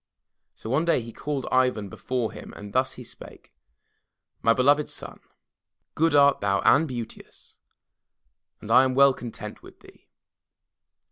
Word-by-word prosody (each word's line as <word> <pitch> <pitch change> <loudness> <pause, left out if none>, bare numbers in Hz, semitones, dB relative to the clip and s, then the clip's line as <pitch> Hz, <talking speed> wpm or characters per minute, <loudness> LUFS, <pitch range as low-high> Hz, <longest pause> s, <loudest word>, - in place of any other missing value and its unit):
So - - -10
one 145 +5 +2
day 170 -5 +2
he 115 -1 -9
called 145 -2 -4
Ivan 125 -5 +1
before 120 +3 -3
him - - -11
and 105 0 -10
thus 130 +1 +1
he 125 - -10
spake: - - -13 0.9
"My 115 - +3
beloved 145 +5 +3
son, - - -8 0.7
good 160 -1 +1
art 140 -1 +5
thou 100 -1 +1
and 160 +3 +4
beauteous, 120 -4 -9 1.0
and 105 - -7
I 130 +3 +7
am 130 -1 0
well 140 0 +6
content 120 -3 -9
with - - -16
thee. - - -19
130 Hz, 145 wpm, -25 LUFS, 115-140 Hz, 1.0 s, I